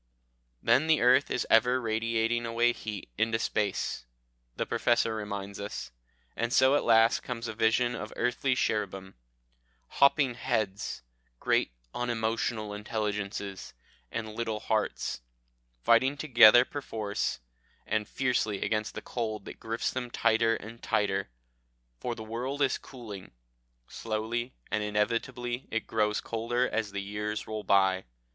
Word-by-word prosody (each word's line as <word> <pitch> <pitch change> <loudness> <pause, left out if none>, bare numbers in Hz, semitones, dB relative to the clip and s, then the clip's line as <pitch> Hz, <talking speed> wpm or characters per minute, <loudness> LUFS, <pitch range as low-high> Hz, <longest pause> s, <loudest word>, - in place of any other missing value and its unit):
Then 130 +7 +4
the 160 -1 +4
earth 125 +3 +5
is 125 - -1
ever 125 +3 +4
radiating 115 0 0
away 120 +1 +2
heat 105 -4 -6
into 115 +1 +2
space, 100 - -1 0.5
the - - -1
Professor 120 -1 +2
reminds 100 -2 -5
us. 65 -12 -5 0.4
And 115 +1 -1
so 130 +1 +5
at 145 - +3
last 115 0 +5
comes 120 -2 -5
a 110 - -4
vision 115 +2 +2
of 110 -2 -6
earthly 125 +2 +1
cherubim, 95 -5 -1 0.7
hopping 140 - +4
heads, 110 - -2 0.4
great - - +1 0.2
unemotional 115 -2 -1
intelligences, 105 - -4 0.4
and 110 -1 -4
little 110 -1 -2
hearts, 110 - -1 0.6
fighting 130 - +4
together 120 -4 +7
perforce 110 -8 -3 0.5
and 105 0 -1
fiercely 120 -6 0
against 110 -1 -1
the - - -6
cold 110 -4 -3
that - - -9
grips 115 +1 -2
them 125 -1 -4
tighter 115 -1 +2
and 115 +2 -9
tighter. 100 -4 0 0.7
For 120 - -3
the 110 - -7
world 125 +6 -2
is 135 - +1
cooling 105 - -10 0.5
slowly 115 +3 -3 0.2
and 110 - +1
inevitably 120 +4 -1
it 115 - -2
grows 105 -1 0
colder 120 +2 0
as 110 -2 -2
the 100 0 -3
years 105 +1 -3
roll 110 -1 -5
by. 95 -1 +3
115 Hz, 130 wpm, -29 LUFS, 105-120 Hz, 0.7 s, together